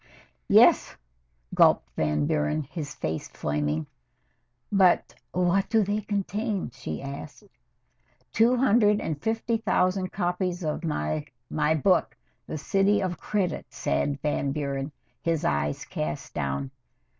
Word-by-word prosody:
"Yes," - - +6 0.6
gulped - - +4
Van 75 -1 +1
Buren, 75 - 0
his 145 +1 -6
face 80 0 -3
flaming. 75 +1 -2 0.9
"But 190 -3 +4 0.2
what 180 +2 +1
do 220 -1 +4
they 205 +2 -1
contain?" 205 0 -2
she 125 - -6
asked. 140 +6 -8 0.9
"Two 235 +3 +4
hundred 210 -4 +4
and 150 -7 -3
fifty 225 +1 0
thousand 185 -3 +1
copies 180 -1 -1
of 155 +2 -2
my 155 -1 -1 0.3
my 155 +1 +2
book 150 - +2 0.3
'The - - -4
City 195 +7 +2
of 180 -3 -2
Credit,'" 185 -6 -2
said 140 - -1
Van 145 -2 0
Buren, 140 0 -3 0.3
his 165 -2 0
eyes 70 0 0
cast 75 0 -4
down. 70 -1 -2
160 Hz, 120 wpm, -27 LUFS, 135-195 Hz, 0.9 s, Yes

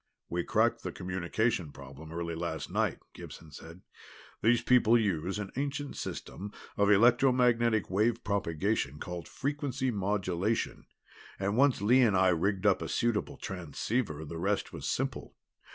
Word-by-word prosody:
"We 85 +1 -1
cracked - - +2
the - - -4
communications 90 -1 -1
problem 70 +4 -11
early 85 0 -3
last 80 -3 -4
night," - - 0 0.2
Gibson 80 -2 -11
said. 80 +5 -11 0.6
"These 115 +2 +3
people 120 -2 +5
use 95 -3 -1
an 105 -2 -5
ancient 140 +1 -3
system 100 +1 -6 0.2
of 100 0 +3
electromagnetic 120 0 +4
wave 110 +5 +1
propagation 95 - -1
called 90 +2 -6
frequency 140 -2 -2
modulation, 100 0 -1 0.5
and 100 +1 -1
once 135 -4 +3
Lee 125 +5 +5
and 110 -6 +4
I 95 0 +5
rigged 95 +3 0
up 100 -2 +4
a - - -4
suitable 115 -3 0
transceiver 90 - -3
the 80 +2 -6
rest 100 +3 -1
was - - -5
simple. - - -3
100 Hz, 140 wpm, -30 LUFS, 85-120 Hz, 0.6 s, people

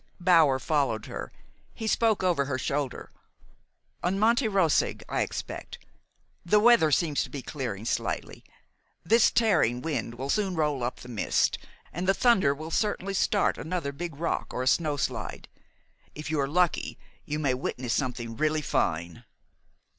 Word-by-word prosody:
Bower 165 -7 +5
followed 130 -7 0
her. - - -6 0.4
He 220 - -5
spoke 220 -2 +2
over 170 -7 +2
her 130 -2 -2
shoulder. 140 -1 -3 0.9
"On 180 +2 0
Monte 230 +4 +3
Roseg, 190 -7 +1
I - - -1
expect. - - -5 0.7
The 210 +5 +4
weather 225 -8 +5
seems 150 -1 +2
to - - -4
be 135 0 -6
clearing 120 -8 -5
slightly. - - -3 0.6
This 230 +1 +5
tearing 175 - +2
wind 135 -5 -3
will 135 +3 -3
soon 200 -4 0
roll 150 -5 0
up 125 +1 -3
the - - -10
mist, 115 -5 0 0.3
and 180 +3 -3
the 195 - +4
thunder 190 - +3
will 155 +3 -8
certainly 200 -1 -1
start 200 +1 +1
another 160 -3 -3
big 165 +2 -6
rock 165 +3 -2
or 125 - -1
a - - -2
snowslide. 150 -1 -1 0.7
If 150 +1 -6
you 155 - 0
are 135 - +1
lucky, 175 +3 0 0.3
you 150 - -3
may 140 -4 +1
witness 125 -1 -3
something 120 -4 -2
really 155 +2 0
fine." 85 - -1
155 Hz, 155 wpm, -27 LUFS, 130-185 Hz, 0.9 s, Bower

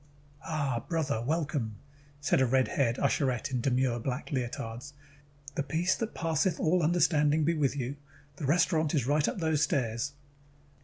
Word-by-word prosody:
"Ah, 140 -7 -1
brother, 150 -8 0
welcome," 140 -5 -1 0.4
said 145 -2 +2
a - - +5
red 130 +1 +2
haired 120 -3 +1
usherette 135 -3 0
in 125 -2 0
demure 125 -1 +1
black 125 +4 -4
leotards. 120 0 -4 0.6
"The - - -1
peace 160 +6 +1
that 225 -1 -4
passeth 165 +1 0
all 175 +3 +2
understanding 155 -2 +3
be 165 +3 +2
with 145 -4 +1
you. 135 +1 -3 0.4
The 140 - -3
restaurant 160 0 +2
is 135 -6 +1
right 145 +2 +2
up - - -2
those 160 -4 +1
stairs." 125 +1 0
145 Hz, 155 wpm, -30 LUFS, 125-160 Hz, 0.6 s, a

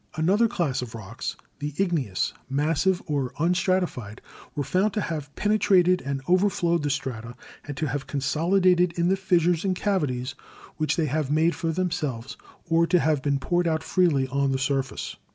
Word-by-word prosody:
"Another 190 +9 +3
class 165 - -1
of 115 -2 -7
rocks 110 +1 -6
— - - -41
the 145 0 -4
igneous, 160 - 0 0.2
massive 160 +6 +1
or 140 -6 -2
un 170 +4 +2
stratified 180 - -1 0.2
— - - -20
were 145 - -1
found 195 +7 +1
to 210 - -1
have 150 -6 -4
penetrated 190 -4 +3
and 135 0 -4
overflowed 175 -2 +2
the 145 - -1
strata 125 -4 -4 0.3
and 145 -2 -6
to 155 - -1
have 135 -1 -3
consolidated 175 +6 +2
in 170 +1 +2
the 190 - +3
fissures 175 -3 +2
and 190 -2 0
cavities 145 -11 -1 0.4
which 155 -2 0
they 165 - +1
have 150 0 -1
made 160 +3 +3
for 165 - -2
themselves, 155 -9 -2 0.3
or 165 0 +3
to 180 - +4
have 155 -3 +1
been 140 0 +1
poured 175 +5 0
out 160 -1 0
freely 160 -9 +2
on 140 +1 +1
the 135 - +1
surface. 135 0 -2
160 Hz, 180 wpm, -25 LUFS, 135-180 Hz, 0.4 s, to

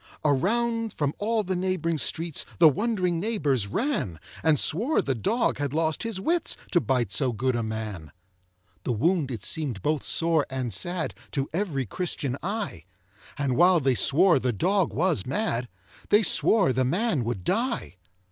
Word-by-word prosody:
Around 230 - +1
from 145 -1 -1
all 220 +1 0
the 185 -1 -2
neighboring 180 -3 -1
streets 160 +3 +1
The 165 - +7
wond'ring 185 - 0
neighbors 150 - 0
ran, 110 - -2 0.2
And 155 -3 +3
swore 230 - +3
the 135 - 0
dog 225 - 0
had 145 -1 -2
lost 160 -1 0
his 225 -4 -3
wits, 335 - 0
To 175 - +3
bite 125 -8 0
so 125 +5 +2
good 125 +3 -1
a 120 - 0
man. 110 -8 -5 0.7
The 125 - -1
wound 155 - +1
it 115 -6 -6
seem'd 135 - -2
both 150 -1 0
sore 165 -3 +1
and 130 -4 -3
sad 175 - -2 0.2
To 140 -2 -2
every 165 -8 -1
Christian 140 - -3
eye; 195 - -4 0.5
And 140 -3 0
while 175 +3 +5
they 135 -3 +2
swore 165 +6 +4
the 125 -1 0
dog 185 - +1
was 165 - 0
mad, 130 - -2 0.4
They 210 +2 +5
swore 195 - +3
the 130 +1 +1
man 170 - 0
would 115 -5 -3
die. 230 - -2
160 Hz, 165 wpm, -26 LUFS, 130-195 Hz, 0.7 s, The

